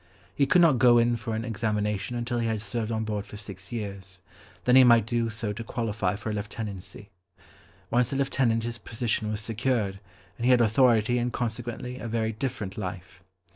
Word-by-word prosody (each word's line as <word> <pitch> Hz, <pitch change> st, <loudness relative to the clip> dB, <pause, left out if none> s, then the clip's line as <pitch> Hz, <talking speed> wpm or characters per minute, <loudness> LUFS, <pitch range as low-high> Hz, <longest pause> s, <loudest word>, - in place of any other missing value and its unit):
He 140 Hz, +7 st, +2 dB
could 180 Hz, -, +5 dB
not 150 Hz, -7 st, +5 dB
go 120 Hz, -2 st, +6 dB
in 120 Hz, 0 st, +3 dB
for 115 Hz, 0 st, -4 dB
an 110 Hz, +1 st, -3 dB
examination 105 Hz, -1 st, -1 dB
until 120 Hz, 0 st, -2 dB
he 115 Hz, -, 0 dB
had 110 Hz, -2 st, -2 dB
served 110 Hz, +2 st, -2 dB
on 110 Hz, 0 st, -1 dB
board 105 Hz, -2 st, -2 dB
for 105 Hz, -, -9 dB
six 95 Hz, -3 st, -9 dB
years, 100 Hz, -4 st, -4 dB, 0.5 s
then 125 Hz, -, +5 dB
he 130 Hz, -, +9 dB
might 120 Hz, -3 st, +6 dB
do 115 Hz, 0 st, 0 dB
so 110 Hz, -1 st, -3 dB
to 115 Hz, +2 st, -6 dB
qualify 110 Hz, -5 st, -1 dB
for 110 Hz, +1 st, -4 dB
a -, -, -3 dB
lieutenancy. 105 Hz, -1 st, -6 dB, 0.8 s
Once 120 Hz, 0 st, +2 dB
a -, -, -1 dB
lieutenant 130 Hz, -4 st, +1 dB
his 120 Hz, 0 st, -4 dB
position 110 Hz, 0 st, -2 dB
was 110 Hz, 0 st, -2 dB
secured, 110 Hz, -3 st, -1 dB, 0.4 s
and 115 Hz, -, -2 dB
he -, -, +4 dB
had 125 Hz, -1 st, +6 dB
authority 120 Hz, 0 st, +4 dB
and 120 Hz, +1 st, -1 dB
consequently 120 Hz, +2 st, -4 dB
a 120 Hz, -, -5 dB
very 110 Hz, -1 st, 0 dB
different 110 Hz, -4 st, -4 dB
life. 90 Hz, -2 st, -6 dB
115 Hz, 195 wpm, -27 LUFS, 105-120 Hz, 0.8 s, he